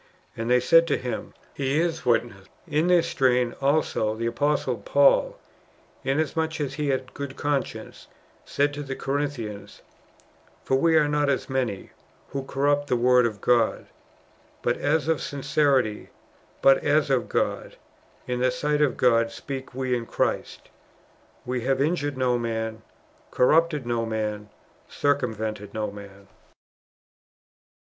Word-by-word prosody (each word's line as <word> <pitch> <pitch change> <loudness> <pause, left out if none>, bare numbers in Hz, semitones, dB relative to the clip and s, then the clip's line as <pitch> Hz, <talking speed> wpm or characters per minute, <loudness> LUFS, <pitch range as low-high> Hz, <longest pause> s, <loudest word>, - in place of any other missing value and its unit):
And 115 +1 -4
they 125 0 +5
said 165 +7 +5
to - - +1
him, 125 -1 -5 0.2
He 140 +2 0
is 165 -5 -1
witness." 115 -5 0 0.2
In 155 +3 +1
this 175 -2 +4
strain 125 -7 +2
also 135 -6 +1
the 115 +1 -4
Apostle 145 +6 0
Paul, - - +3 0.7
inasmuch 160 +3 -1
as 145 -3 -2
he 150 -2 -2
had 135 -1 +1
a 130 - -19
good 140 -1 -6
conscience, 145 -2 -3 0.4
said 145 +1 0
to 145 - -5
tlie 135 -1 -6
Corinthians: 135 -8 -4 0.4
*' - - -33
For 130 - +2
we 160 +4 +3
are 150 -1 +4
not 145 -1 +1
as 135 0 -1
many, 125 -7 -2 0.4
who 140 - -3
corrupt 145 +2 0
the 125 - +1
Word 125 0 +4
of 105 -3 -7
God: 120 -2 +2 0.8
bat 120 - +1
as 155 +2 0
of 160 -2 +1
sincerity, 135 -5 0 0.5
but 135 0 +6
as 145 -1 +2
of 130 -3 +1
God, - - -2 0.5
in 125 0 -2
the 130 +1 +3
sight 150 +3 -1
of 145 -3 +2
God 115 -2 +3
speak 130 +2 -7
we 130 -1 0
in 115 -1 -4
Christ;"^ - - -2 0.8
^* 130 - -1
AYe 125 - -2
have 135 +1 +1
injured 145 -2 0
no 125 -2 +1
man, 110 -1 -3 0.5
corrupted 155 +1 +2
no 120 -1 -1
man, 105 -1 -3 0.4
circumvented 110 -7 -2
no 110 -2 -2
man." 100 -1 -12
130 Hz, 145 wpm, -25 LUFS, 115-145 Hz, 0.8 s, but